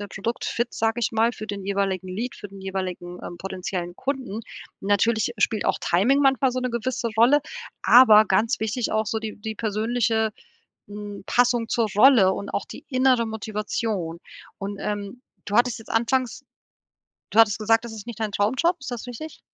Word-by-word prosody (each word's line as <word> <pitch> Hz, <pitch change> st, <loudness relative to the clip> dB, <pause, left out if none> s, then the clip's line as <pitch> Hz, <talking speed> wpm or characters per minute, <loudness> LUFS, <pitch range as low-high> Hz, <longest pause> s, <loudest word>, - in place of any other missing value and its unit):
der 205 Hz, -, -5 dB
Produkt-Fit, 230 Hz, +4 st, -3 dB
sage 225 Hz, +1 st, 0 dB
ich -, -, 0 dB
mal, 225 Hz, +1 st, +2 dB
für 215 Hz, -, -8 dB
den 200 Hz, -1 st, -5 dB
jeweiligen 195 Hz, -2 st, -1 dB
Lead, 225 Hz, +7 st, -4 dB
für -, -, -8 dB
den 195 Hz, 0 st, -12 dB
jeweiligen, 185 Hz, -2 st, -5 dB
ähm, 175 Hz, -, -7 dB
potenziellen 185 Hz, -1 st, -5 dB
Kunden. 260 Hz, -6 st, -3 dB, 0.4 s
Natürlich 215 Hz, +4 st, +1 dB
spielt 215 Hz, -, +1 dB
auch -, -, +1 dB
Timing 230 Hz, +11 st, +3 dB
manchmal 270 Hz, -2 st, +3 dB
so 255 Hz, -, -2 dB
'ne 250 Hz, 0 st, -2 dB
gewisse 235 Hz, 0 st, -2 dB
Rolle, 250 Hz, +6 st, +5 dB, 0.4 s
aber 215 Hz, 0 st, +8 dB
ganz 210 Hz, +4 st, +1 dB
wichtig 220 Hz, +2 st, -1 dB
auch 220 Hz, 0 st, +1 dB
so 220 Hz, -, -1 dB
die 220 Hz, -1 st, -5 dB
die 220 Hz, 0 st, -5 dB
persönliche, 220 Hz, 0 st, 0 dB, 0.6 s
hm, 205 Hz, 0 st, -8 dB
Passung 245 Hz, -2 st, +2 dB
zur 235 Hz, -2 st, +1 dB
Rolle 215 Hz, -5 st, +6 dB
und 200 Hz, -, -6 dB
auch -, -, -3 dB
die -, -, -11 dB
innere 255 Hz, -3 st, +3 dB
Motivation. 210 Hz, -5 st, -3 dB, 0.4 s
Und, 200 Hz, 0 st, -5 dB
ähm, 205 Hz, +3 st, -4 dB, 0.2 s
du 205 Hz, +1 st, -1 dB
hattest 240 Hz, -1 st, +3 dB
jetzt 225 Hz, -, -15 dB
anfangs 250 Hz, +3 st, 0 dB, 0.9 s
du -, -, -3 dB
hattest 225 Hz, -1 st, +5 dB
gesagt, 225 Hz, +2 st, +2 dB
das 235 Hz, -, -7 dB
ist 220 Hz, 0 st, -9 dB
nicht 235 Hz, -2 st, -7 dB
dein 215 Hz, -2 st, -2 dB
Traumjob, 260 Hz, -, +1 dB
ist 270 Hz, -, -6 dB
das 240 Hz, -2 st, -5 dB
richtig? 275 Hz, +6 st, -8 dB
220 Hz, 180 wpm, -24 LUFS, 200-240 Hz, 0.9 s, aber